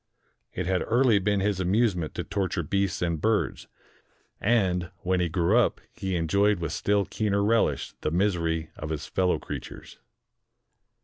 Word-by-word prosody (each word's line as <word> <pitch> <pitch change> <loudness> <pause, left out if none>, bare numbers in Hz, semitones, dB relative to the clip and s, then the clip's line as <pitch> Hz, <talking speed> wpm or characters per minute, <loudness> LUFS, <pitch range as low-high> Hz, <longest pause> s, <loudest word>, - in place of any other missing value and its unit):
It 90 - -2
had 90 0 +1
early 120 -2 +4
been 100 0 +1
his 100 -1 0
amusement 95 -3 +1
to - - -2
torture 95 -3 -2
beasts 95 +3 -1
and 85 -3 -1
birds; 110 -1 0 0.7
and, 95 -6 +1
when 95 0 +1
he 90 -1 +1
grew 85 +5 +2
up, 120 - +1
he 95 -1 -3
enjoyed 100 +5 +2
with 85 -3 -3
still 100 -1 +1
keener 100 -1 0
relish 115 +2 +1
the - - 0
misery 85 -3 0
of 75 - -6
his 80 -1 -3
fellow 90 -1 +1
creatures. - - -8
95 Hz, 150 wpm, -27 LUFS, 85-105 Hz, 0.7 s, early